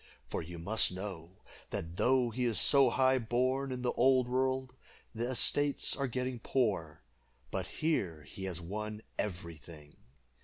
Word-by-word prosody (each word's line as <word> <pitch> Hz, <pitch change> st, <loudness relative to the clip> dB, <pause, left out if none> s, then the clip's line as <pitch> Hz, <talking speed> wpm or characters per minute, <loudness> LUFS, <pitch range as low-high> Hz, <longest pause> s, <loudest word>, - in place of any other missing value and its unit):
For -, -, -4 dB
you 85 Hz, +1 st, -8 dB
must 100 Hz, +7 st, +1 dB
know, 95 Hz, -2 st, -8 dB, 0.3 s
that 80 Hz, +2 st, -5 dB
though 125 Hz, -2 st, +3 dB
he 125 Hz, +2 st, -1 dB
is 115 Hz, -3 st, 0 dB
so 140 Hz, -1 st, +5 dB
high 130 Hz, 0 st, +3 dB
born 130 Hz, +4 st, 0 dB
in 125 Hz, -1 st, -4 dB
the 125 Hz, -, +1 dB
old 130 Hz, 0 st, +3 dB
world, 130 Hz, 0 st, 0 dB, 0.4 s
the 115 Hz, +1 st, -2 dB
estates 140 Hz, +3 st, +4 dB
are 140 Hz, -1 st, -1 dB
getting 125 Hz, 0 st, -3 dB
poor, 95 Hz, -, -1 dB, 0.5 s
but -, -, -3 dB
here 90 Hz, -, -1 dB
he 95 Hz, +7 st, -8 dB
has 90 Hz, -3 st, -4 dB
won 105 Hz, +5 st, -5 dB, 0.2 s
every 85 Hz, -5 st, -4 dB
thing. 75 Hz, -1 st, -14 dB
115 Hz, 155 wpm, -32 LUFS, 90-130 Hz, 0.5 s, so